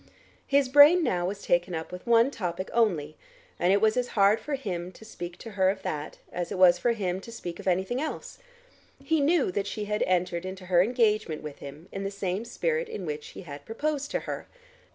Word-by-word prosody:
His 280 -1 +3
brain 290 +6 +7
now 175 - 0
was 200 +1 -5
taken 175 0 +1
up 160 +1 -5
with 180 +5 -9
one 235 +3 +5
topic 185 -5 -4
only, 170 -11 +1 0.4
and 180 - +3
it 200 - +4
was 220 +1 +3
as 250 -1 0
hard 200 +2 +5
for 295 - -3
him 180 -9 -4
to 220 - -14
speak 175 -5 -7
to 225 - -9
her 190 -2 +2
of 190 0 -3
that, 150 0 -4
as 175 -1 -4
it - - -3
was 180 -1 +6
for 235 +5 +2
him 190 -4 -2
to 230 - -10
speak 175 -7 -7
of - - -8
anything 190 +8 0
else. 315 - -5 0.6
He 320 -2 +1
knew 295 - +3
that 200 +2 -2
she 210 +1 -4
had 210 +1 -2
entered 180 -1 0
into 185 0 -7
her 175 -1 +4
engagement 215 -7 +1
with 150 -2 -8
him, 150 +5 -10
in 195 - -5
the 195 - -2
same 195 +1 -3
spirit 470 - -1
in 190 - -5
which 150 -1 -5
he - - -10
had 145 -3 -9
proposed 285 - -2
to - - -2
her. - - -6
195 Hz, 220 wpm, -27 LUFS, 175-235 Hz, 0.6 s, brain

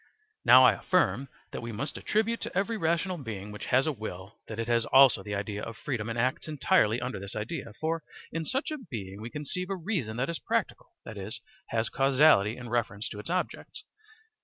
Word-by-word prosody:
* 435 - -43
Now - - +9
I - - +8
affirm 135 - +1 0.2
that - - -5
we 115 0 -5
must 115 +7 -3
attribute 220 +2 0
to - - -4
every 205 +4 +1
rational 170 -1 0
being 105 -6 -6
which 105 - -7
has 130 +2 +4
a 155 - +1
will 105 -4 -8
that 110 - -6
it 115 0 -2
has 120 -1 +3
also 135 -6 +7
the 100 +1 -4
idea 105 +1 -3
of 115 -1 -6
freedom 120 -6 -3
and 115 - -3
acts 130 +6 0
entirely 145 - +3
under 125 -4 -4
this 100 +1 -8
idea. 110 +1 -4
For 165 +1 -1 0.3
in 165 0 -2
such 265 - -1
a 305 - -3
being 105 - -7
we 115 - -5
conceive 150 +7 -4
a 195 - -1
reason 170 - -2
that 125 +2 0
is 170 -2 -3
practical, - - -2
that 110 - -7
is, 105 +5 -6 0.3
has 115 0 0
causality 135 -6 +4
in 120 -1 -8
reference 110 -3 -1
to 105 - -7
its 105 - -7
objects. 180 +1 -3
120 Hz, 210 wpm, -29 LUFS, 110-160 Hz, 0.3 s, Now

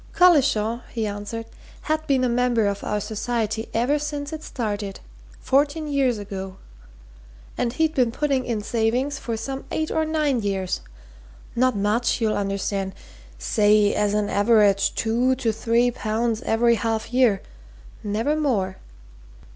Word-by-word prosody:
"Collishaw," 265 -10 +4
he 225 -2 -2
answered, 205 +2 -5 0.4
"had 310 0 -2
been 265 -2 +2
a - - +3
member 240 -2 +2
of 200 0 -2
our 210 - -1
society 220 +1 -2
ever 255 +6 +1
since 290 0 -4
it 315 - -5
started 205 -8 -4 0.4
fourteen 290 +3 +1
years 270 -5 +1
ago. 195 -2 -6 1.0
And 235 - -1
he'd 315 +2 +1
been 250 -6 +2
putting 275 0 0
in 225 -4 -2
savings 245 +5 0
for 230 -2 -3
some 270 +4 -5
eight 315 0 -2
or 320 - +1
nine 305 -5 0
years. 195 - -2 0.7
Not 255 0 +2
much, 210 +4 +1
you'll 220 -2 +1
understand. 195 -1 -2 0.4
Say, 205 - +3
as 210 0 +1
an 210 -1 +1
average, 205 -2 +3
two 240 +3 +1
to 245 -3 0
three 235 +2 +2
pounds 225 0 -1
every 235 +1 +4
half 225 +1 -2
year 245 -6 +3 0.6
never 220 +8 0
more. 215 -12 0
230 Hz, 140 wpm, -23 LUFS, 210-265 Hz, 1.0 s, Collishaw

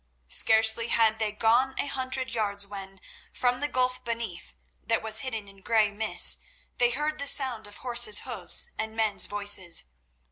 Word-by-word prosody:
Scarcely 220 - +3
had 225 -1 +2
they 215 -1 -1
gone 235 +5 +1
a - - -1
hundred 260 -1 -2
yards 205 -3 -1
when, 195 -1 -10 0.3
from 250 0 -1
the 290 - -1
gulf 255 -2 -2
beneath, 230 - -6 0.3
that - - -1
was 220 0 +1
hidden 225 -5 -5
in 195 -1 -16
grey 215 -1 +1
mists, 215 +1 +4 0.4
they 245 - +4
heard 300 +5 -2
the 280 - -3
sound 255 -7 +2
of 205 - -13
horse's 240 -4 +2
hoofs - - 0
and 220 0 -4
men's 215 -4 +1
voices. 200 -4 +1
220 Hz, 165 wpm, -26 LUFS, 205-250 Hz, 0.4 s, mists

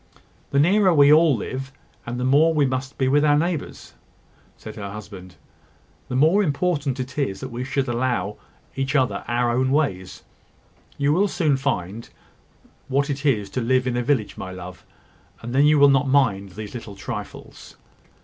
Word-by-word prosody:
"The 140 - +1
nearer 185 +3 +4
we 145 0 +6
all 155 -2 +5
live, 130 +5 -5 0.4
and 120 +1 -4
the - - -2
more 150 +5 +3
we 145 -2 +3
must 130 +1 -4
be 130 - +1
with 145 +3 +3
our 145 -1 +4
neighbours," 165 0 -3 0.6
said - - -10
her 100 -2 -6
husband, 95 -3 -10 0.7
"the 125 - -4
more 160 +10 +4
important 145 -5 -1
it 130 +2 -5
is 115 -9 -2
that 130 - -6
we 120 +2 -4
should 135 +1 -2
allow 120 -3 -2 0.4
each 135 +2 -2
other 125 -8 +1
our 120 +1 0
own 130 +1 +1
ways. 130 -11 -1 0.7
You 145 +1 +1
will 195 +5 +2
soon 155 -7 +1
find 115 -6 -3 0.8
what 140 +2 0
it 140 +2 -3
is 105 -7 +1
to 130 - -2
live 130 +2 +1
in 125 -1 -1
a 125 - 0
village, 120 -4 -1
my 95 - -6
love; 90 -1 -10 0.6
and 120 +1 -6
then 140 +2 +4
you 150 0 +4
will 140 0 +7
not 140 +1 +2
mind 100 -9 +1
these 105 +1 -8
little 115 -4 -8
trifles." 100 - -9
130 Hz, 180 wpm, -22 LUFS, 115-145 Hz, 0.8 s, will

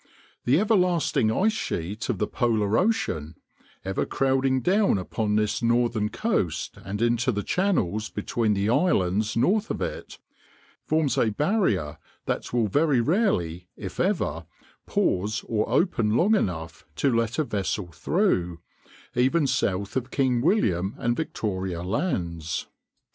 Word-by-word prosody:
The 135 +6 +4
everlasting 180 - +2
ice 215 - +2
sheet 105 - -4
of 120 - 0
the 105 - 0
polar 110 -3 0
ocean, 85 - 0 0.5
ever 95 0 -1
crowding 135 -1 +1
down 195 - +3
upon 105 +3 -2
this 105 +2 0
northern 115 -2 +1
coast 95 - -1
and 105 +3 -3
into 120 +2 +2
the 105 -3 -2
channels 110 - 0
between 105 +1 -1
the 100 +1 0
islands 110 - +1
north 205 - +2
of - - -3
it, - - -5 0.7
forms 155 -5 +1
a 115 - +3
barrier 110 - 0 0.3
that - - -3
will 120 -3 +1
very 145 +4 +2
rarely, 105 - 0
if 95 -3 -7
ever, 85 - 0 0.4
pause 105 +5 0
or 110 -2 0
open 115 - +2
long 205 +6 +4
enough 85 - -2
to 135 - +1
let 115 +1 0
a 155 - +2
vessel 100 - -3
through, 90 - 0 0.5
even 130 +5 +2
south 100 -6 -1
of 130 -1 -2
King 130 -3 +1
William 105 - +1
and 120 0 0
Victoria 95 - -3
lands. 85 - -2
115 Hz, 135 wpm, -25 LUFS, 95-150 Hz, 0.7 s, The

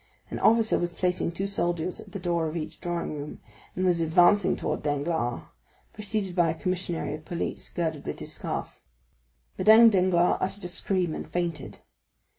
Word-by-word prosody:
An - - -4
officer 225 -1 +4
was 175 0 -2
placing 180 -1 0
two 190 +3 -3
soldiers 175 -3 -1
at 195 - -12
the 200 - -5
door 170 -3 -1
of 155 +2 -4
each 155 - -6
drawing 175 -3 -3
room, 145 0 -7 0.4
and 185 - 0
was 175 -2 +2
advancing 175 +4 +4
towards - - -3
Danglars, 145 -4 -1 0.5
preceded 205 -3 -3
by 170 -2 +3
a 160 0 -3
commissary 180 -4 -2
of 155 +1 -7
police, 170 +2 -4
girded 160 -4 -3
with - - -3
his - - -6
scarf. - - -5 0.8
Madame 225 +1 +8
Danglars 180 -3 +3
uttered 195 +1 -3
a - - -3
scream 180 -1 0
and - - -6
fainted. 170 -5 -3
175 Hz, 170 wpm, -27 LUFS, 165-190 Hz, 0.8 s, Madame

